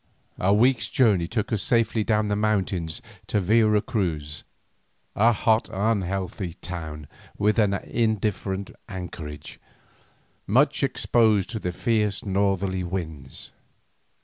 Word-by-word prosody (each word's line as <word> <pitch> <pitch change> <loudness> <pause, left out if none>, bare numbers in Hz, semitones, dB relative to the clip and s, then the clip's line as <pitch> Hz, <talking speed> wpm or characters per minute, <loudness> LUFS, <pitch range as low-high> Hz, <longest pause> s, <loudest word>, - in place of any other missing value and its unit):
A 95 - +2
week's 120 +5 +3
journey 100 -9 +3
took 110 +2 -2
us 105 - 0
safely 115 -2 +2
down 105 0 +1
the 105 - 0
mountains 95 -6 -1 0.2
to 105 - +1
Vera 105 +2 +3
Cruz, 75 -8 -2 0.7
a 115 +3 +5
hot 110 0 +2
unhealthy 95 -3 -1
town 80 -4 -7 0.3
with 105 +2 +2
an 100 -2 +3
indifferent 105 -3 -1 0.2
anchorage, 80 -6 -7 0.9
much 135 +7 +3
exposed 115 -6 +2
to 110 - -3
the 90 - -2
fierce 105 0 0
northerly 95 -1 0
winds. 80 -7 -5
100 Hz, 115 wpm, -25 LUFS, 90-110 Hz, 0.9 s, a